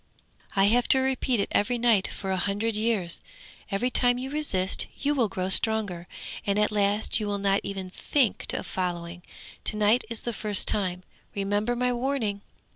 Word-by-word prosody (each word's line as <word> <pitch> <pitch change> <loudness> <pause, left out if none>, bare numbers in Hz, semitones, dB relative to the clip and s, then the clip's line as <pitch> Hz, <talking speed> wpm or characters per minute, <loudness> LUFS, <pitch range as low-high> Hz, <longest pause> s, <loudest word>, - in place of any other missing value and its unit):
I 195 - +4
have 235 +5 +3
to 265 - +5
repeat 260 -2 +1
it 200 - 0
every 240 +4 +1
night 230 -5 +5
for 195 -1 -5
a - - +1
hundred 205 +4 -1
years. 210 -6 0 0.5
Every 220 +5 0
time 245 0 +3
you 260 +2 -5
resist, 200 -12 -1
you 290 +1 0
will 245 -7 +1
grow 185 -1 -3
stronger, 200 -5 +1 0.4
and 200 0 0
at 210 0 +2
last 205 +2 +1
you 210 - -3
will 205 0 -1
not 195 0 +2
even 190 -2 -6
think 255 +1 0
of - - -4
following. 175 -1 -4 0.4
To 215 - +2
night 215 +4 +3
is 230 -1 -3
the 240 - -3
first 210 -2 +2
time. 185 -3 +1 0.3
Remember 205 +4 0
my 250 0 +1
warning!' 240 -5 -1
210 Hz, 180 wpm, -26 LUFS, 195-240 Hz, 0.5 s, to